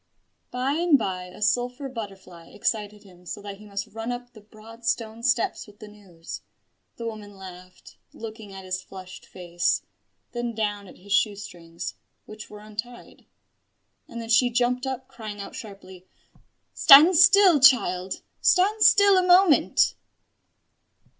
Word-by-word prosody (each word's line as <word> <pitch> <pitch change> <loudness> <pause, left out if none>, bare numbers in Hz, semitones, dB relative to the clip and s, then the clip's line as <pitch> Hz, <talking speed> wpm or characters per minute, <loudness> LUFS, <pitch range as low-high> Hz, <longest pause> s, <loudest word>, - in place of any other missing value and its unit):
By 255 +2 -2
and 330 -1 +3
by 185 -6 -4
a 180 +3 -8
sulphur 245 +5 -1
butterfly 195 -8 -10
excited 210 -1 -4
him 180 -2 -19
so - - -6
that 200 -1 -9
he 210 - -14
must 200 -1 -5
run 225 +3 -6
up 245 0 -8
the 215 - -15
broad 220 +2 -16
stone 230 0 -3
steps 240 -2 -1
with 205 0 -17
the 215 - -12
news. 195 -6 -11 0.5
The 235 - -8
woman 215 -3 -8
laughed, 185 -1 -14
looking 220 -2 -10
at 190 -1 -10
his 185 0 -4
flushed 185 0 -12
face, 175 -1 -2 0.5
then 240 -1 -4
down 205 -2 -3
at - - -15
his 200 +2 -6
shoe 210 -1 +2
strings, 170 -4 -9 0.3
which 215 0 -11
were 210 0 -12
untied: 215 +3 -10 0.8
and 235 - -9
then 225 -1 -8
she 245 +2 +4
jumped 250 +2 -1
up, 260 0 -5
crying 220 -6 -9
out 200 - -8
sharply 190 -5 -12 0.7
"Stand 310 +7 +8
still, 365 -1 +6
child 190 -9 +3 0.2
stand 405 +4 +2
still 405 -2 +6
a - - 0
moment!" 360 -3 +4
215 Hz, 150 wpm, -24 LUFS, 195-250 Hz, 0.8 s, Stand